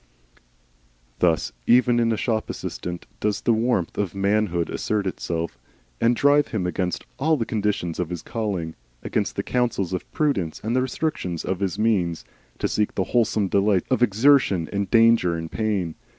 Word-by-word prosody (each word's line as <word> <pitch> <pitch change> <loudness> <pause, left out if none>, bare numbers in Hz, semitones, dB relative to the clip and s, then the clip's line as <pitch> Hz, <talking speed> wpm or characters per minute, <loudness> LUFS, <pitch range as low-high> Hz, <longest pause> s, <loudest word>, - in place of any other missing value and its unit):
Thus 85 -3 +2 0.2
even 120 0 +5
in 115 -1 +2
a 110 - 0
shop 110 -1 -1
assistant 90 -1 -5
does 105 -1 -1
the 115 - +3
warmth 110 -5 0
of 100 -3 -2
manhood 100 -4 +1
assert 105 -2 -1
itself, 85 -4 -3 0.4
and 120 +1 +4
drive 145 +3 +4
him 105 -6 -2
against 90 0 -2
all 155 +3 +2
the 115 - -1
conditions 105 -7 -2
of 90 -2 -1
his 90 -3 -5
calling, 100 -8 -3 0.3
against - - -1
the - - -2
counsels 115 -7 -1
of 90 - -5
prudence 120 - 0
and 115 +3 -1
the 130 - +3
restrictions 125 - -2
of 95 -1 -2
his 95 -4 -2
means, 95 -7 0 0.3
to - - 0
seek 105 -1 -1
the 95 - +1
wholesome 110 -4 +2
delights 100 +1 +1
of 130 - +2
exertion 115 - +4
and 100 -1 -1
danger 115 -7 +4
and 80 -1 -5
pain. 100 -7 -1
105 Hz, 165 wpm, -24 LUFS, 90-115 Hz, 0.4 s, even